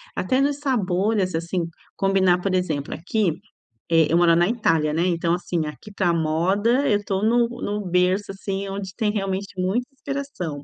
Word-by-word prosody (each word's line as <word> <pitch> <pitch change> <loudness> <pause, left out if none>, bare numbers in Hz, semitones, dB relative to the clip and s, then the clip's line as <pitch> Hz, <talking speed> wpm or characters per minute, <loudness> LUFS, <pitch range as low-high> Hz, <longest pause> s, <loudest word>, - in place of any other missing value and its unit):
até 260 0 +1
nos 285 0 +1
sabores, 200 - 0
assim, 170 +1 -2 0.3
combinar, 190 -2 +2
por 190 0 -1
exemplo, 155 -6 -1
aqui 185 +2 0 0.6
eh, 165 -2 +5
eu 170 - +4
moro 170 -1 +5
na 175 +1 +3
Itália, 165 -10 +1
né, 165 +3 +1
então, 170 -1 +1
assim, 175 -2 -2
aqui, 150 +8 -9
para 185 -3 +1
a - - +3
moda, 190 - +1
eu 205 - +3
tô 195 0 -1
no 235 +2 +3
no 205 +1 -2
berço, 180 +3 +1
assim, 195 0 -4
onde 195 -1 -5
tem 215 -2 +1
realmente 195 -1 -3
muita 205 +7 0
inspiração. 270 - -5
190 Hz, 175 wpm, -23 LUFS, 170-210 Hz, 0.6 s, eh